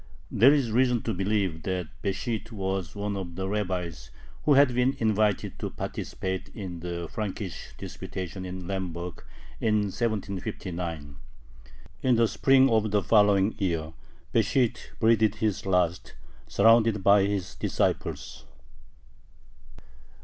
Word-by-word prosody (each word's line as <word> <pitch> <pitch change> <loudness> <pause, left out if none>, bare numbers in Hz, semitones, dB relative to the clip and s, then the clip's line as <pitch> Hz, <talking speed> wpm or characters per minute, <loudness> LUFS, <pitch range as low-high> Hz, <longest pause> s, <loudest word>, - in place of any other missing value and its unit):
There 125 +6 +6
is 140 -6 +2
reason 125 -1 +2
to 115 - -1
believe 95 -3 0
that 90 -2 -3
Besht 110 +4 -3
was 95 -4 -3
one 100 0 -2
of 90 -3 -5
the 95 +1 -3
rabbis 90 -9 -3 0.4
who 145 - +5
had 140 -2 +5
been 125 +2 +1
invited 105 -2 +1
to - - -3
participate 95 0 -4
in 90 -5 -6
the 85 0 -4
Frankist 100 -1 -5
disputation 95 0 -6
in 90 0 -6
Lemberg, 90 -2 -4 0.4
in 105 -2 +1
1759. 90 - -3 0.8
In 130 -2 +3
the 115 0 +4
spring 135 +3 +4
of 110 -1 +2
the 105 -1 +1
following 105 -1 +4
year, 80 -5 -1 0.4
Besht 115 +2 +2 0.2
breathed 110 -2 +4
his 105 -2 -1
last, 90 -2 0 0.3
surrounded 115 -3 +4
by 100 0 +6
his 100 -3 -2
disciples. - - -2
100 Hz, 120 wpm, -27 LUFS, 90-110 Hz, 0.8 s, There